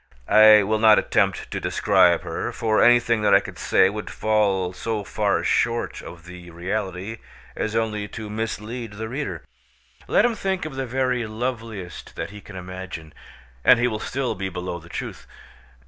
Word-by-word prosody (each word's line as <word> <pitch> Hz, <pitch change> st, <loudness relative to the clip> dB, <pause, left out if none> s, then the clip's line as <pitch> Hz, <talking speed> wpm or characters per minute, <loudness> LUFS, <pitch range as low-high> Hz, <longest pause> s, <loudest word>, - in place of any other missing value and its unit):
I 110 Hz, 0 st, +8 dB
will 110 Hz, +2 st, 0 dB
not 110 Hz, -1 st, +7 dB
attempt -, -, 0 dB
to -, -, -2 dB
describe 85 Hz, -1 st, +3 dB
her, 85 Hz, -2 st, -4 dB
for 110 Hz, -1 st, +1 dB
anything 120 Hz, -2 st, +4 dB
that 105 Hz, -2 st, +5 dB
I -, -, +7 dB
could -, -, -10 dB
say -, -, +4 dB
would 105 Hz, +2 st, -5 dB
fall 100 Hz, -4 st, +1 dB
so 110 Hz, +2 st, -3 dB
far 90 Hz, -, 0 dB
short 115 Hz, 0 st, 0 dB
of 85 Hz, 0 st, -11 dB
the 90 Hz, 0 st, -11 dB
reality 95 Hz, +4 st, -4 dB, 0.4 s
as 110 Hz, +1 st, -3 dB
only 105 Hz, -2 st, -1 dB
to 110 Hz, 0 st, -7 dB
mislead 110 Hz, +1 st, -5 dB
the 110 Hz, +2 st, -5 dB
reader. 135 Hz, +6 st, -4 dB, 0.6 s
Let -, -, +4 dB
him 240 Hz, -, +2 dB
think 190 Hz, -5 st, -2 dB
of 155 Hz, -, -6 dB
the 135 Hz, -1 st, -4 dB
very 125 Hz, -2 st, 0 dB
loveliest 110 Hz, -5 st, -5 dB
that -, -, -5 dB
he 105 Hz, 0 st, -10 dB
can 100 Hz, -, -12 dB
imagine, 90 Hz, -3 st, -8 dB, 0.5 s
and 125 Hz, -, +7 dB
he 120 Hz, +1 st, +2 dB
will 110 Hz, -3 st, -3 dB
still 130 Hz, +2 st, -2 dB
be 95 Hz, 0 st, -4 dB
below 90 Hz, -1 st, -5 dB
the 85 Hz, +1 st, -16 dB
truth. -, -, -6 dB
110 Hz, 175 wpm, -23 LUFS, 95-115 Hz, 0.6 s, I